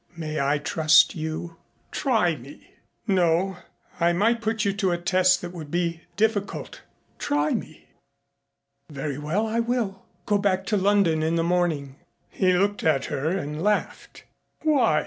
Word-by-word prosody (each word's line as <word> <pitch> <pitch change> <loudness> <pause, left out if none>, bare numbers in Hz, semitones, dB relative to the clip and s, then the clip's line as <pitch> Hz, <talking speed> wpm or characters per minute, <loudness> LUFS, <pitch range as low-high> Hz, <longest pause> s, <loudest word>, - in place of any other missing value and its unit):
May 155 -2 -3
I 140 +2 +2
trust 155 +1 +4
you?" 160 +1 -5 0.3
"Try 220 - +1
me." 135 +2 -14 0.3
"No, 185 -1 +2 0.4
I 170 0 +3
might 225 +6 +2
put 220 -1 -1
you 200 - +1
to 195 -1 0
a 175 - 0
test 185 +1 +2
that 175 - -5
would 160 -4 -8
be 170 0 -1 0.2
difficult." 210 -2 -1 0.4
"Try 145 +1 0
me." 155 - -6 1.0
"Very 140 -1 -4
well, 165 +9 -1
I 225 +1 -1
will. 230 -5 -1 0.2
Go 205 -1 +2
back 190 -2 0
to - - +5
London 195 -5 +3
in 160 +1 0
the 165 - +1
morning." 165 -6 0 0.3
He 185 -1 +2
looked 200 +3 +1
at 155 -4 +2
her 145 +4 -1
and 155 -4 -3
laughed. 210 +2 -2 0.4
"Why?" 280 - +3
175 Hz, 150 wpm, -25 LUFS, 155-200 Hz, 1.0 s, to